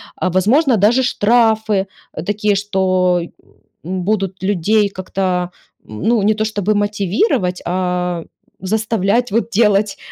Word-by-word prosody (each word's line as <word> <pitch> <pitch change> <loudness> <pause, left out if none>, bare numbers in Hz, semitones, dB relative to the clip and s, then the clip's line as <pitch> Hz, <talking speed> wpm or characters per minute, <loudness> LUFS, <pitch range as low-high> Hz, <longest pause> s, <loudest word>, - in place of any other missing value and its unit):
а, 185 - -1
возможно, 245 - +3
даже 225 +6 +3
штрафы 220 -3 +2 0.4
такие, 210 0 0
что, 185 -3 +1 0.6
м, 185 0 -3
будут 195 -2 -2
людей 205 +2 +1
как-то, 185 -2 -2 0.3
ну, 205 - -1
не 215 +1 +3
то, 215 +1 -2
чтобы 215 -1 -1
мотивировать, 205 - 0
а 180 -1 -1 0.4
заставлять 220 +3 0
вот 230 +2 0
делать 210 -1 +2
200 Hz, 115 wpm, -17 LUFS, 185-215 Hz, 0.6 s, возможно